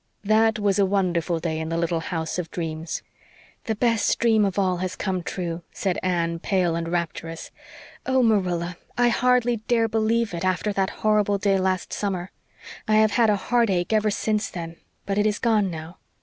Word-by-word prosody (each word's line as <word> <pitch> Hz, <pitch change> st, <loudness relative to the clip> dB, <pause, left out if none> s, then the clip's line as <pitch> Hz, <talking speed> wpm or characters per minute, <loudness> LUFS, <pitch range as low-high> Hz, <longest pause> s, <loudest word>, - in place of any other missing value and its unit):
That 220 Hz, +2 st, +3 dB
was 205 Hz, -1 st, +1 dB
a 200 Hz, -, +5 dB
wonderful 175 Hz, -3 st, 0 dB
day 160 Hz, -1 st, -2 dB
in 160 Hz, 0 st, -4 dB
the 165 Hz, -, -1 dB
little 170 Hz, 0 st, 0 dB
house 160 Hz, +1 st, -3 dB
of 170 Hz, -2 st, -4 dB
dreams. 160 Hz, -1 st, -4 dB, 0.6 s
"The 220 Hz, -, -1 dB
best 230 Hz, 0 st, +2 dB
dream 220 Hz, -3 st, +3 dB
of 195 Hz, -1 st, -2 dB
all 185 Hz, -2 st, +2 dB
has 185 Hz, 0 st, -3 dB
come 185 Hz, -2 st, -2 dB
true," 170 Hz, -1 st, -4 dB
said 190 Hz, -3 st, -2 dB
Anne, 170 Hz, -2 st, 0 dB
pale 180 Hz, -2 st, +1 dB
and 165 Hz, 0 st, -3 dB
rapturous. 165 Hz, -1 st, -4 dB, 0.6 s
"Oh, 260 Hz, -1 st, +3 dB
Marilla, 180 Hz, -6 st, +1 dB, 0.2 s
I 245 Hz, 0 st, +4 dB
hardly 245 Hz, 0 st, +2 dB
dare 225 Hz, +1 st, +1 dB
believe 225 Hz, -1 st, 0 dB
it, 170 Hz, -, -4 dB
after 185 Hz, +3 st, 0 dB
that 195 Hz, -1 st, 0 dB, 0.2 s
horrible 210 Hz, -1 st, +3 dB
day 195 Hz, -1 st, +2 dB
last 185 Hz, -1 st, -1 dB
summer. 190 Hz, -3 st, -3 dB, 0.6 s
I 215 Hz, -, +3 dB
have 215 Hz, 0 st, +4 dB
had 230 Hz, -1 st, +3 dB
a 210 Hz, -, +4 dB
heartache 205 Hz, -3 st, +1 dB
ever 215 Hz, 0 st, +3 dB
since 210 Hz, 0 st, -1 dB
then 165 Hz, -1 st, -7 dB, 0.3 s
but 200 Hz, +1 st, -1 dB
it 210 Hz, -, +3 dB
is 210 Hz, -1 st, 0 dB
gone 215 Hz, -4 st, +2 dB
now." 160 Hz, +1 st, -8 dB
195 Hz, 185 wpm, -24 LUFS, 170-215 Hz, 0.6 s, a